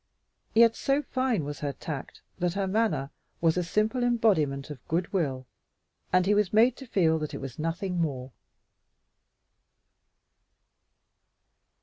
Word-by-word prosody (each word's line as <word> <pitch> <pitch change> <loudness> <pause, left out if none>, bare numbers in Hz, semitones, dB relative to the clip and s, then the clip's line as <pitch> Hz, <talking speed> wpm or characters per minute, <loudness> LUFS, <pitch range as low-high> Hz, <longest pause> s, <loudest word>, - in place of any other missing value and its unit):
Yet 230 0 +6
so 275 +2 +1
fine 255 - 0
was 145 0 -5
her 145 -1 -2
tact 145 -2 -7 0.2
that 175 0 0
her 200 -1 0
manner 185 -9 0 0.3
was 165 -1 +3
a 180 - +1
simple 215 +8 0
embodiment 160 - +1
of 135 -5 -10
good 175 +4 -1
will, 135 -8 -1 0.7
and 185 0 +4
he 205 - +3
was 210 -3 +2
made 230 +3 +5
to 270 - -10
feel 160 -7 +2
that 155 -1 -4
it - - -5
was 135 -1 -8
nothing 175 +3 -2
more. 135 -5 -3
180 Hz, 135 wpm, -28 LUFS, 150-220 Hz, 0.7 s, Yet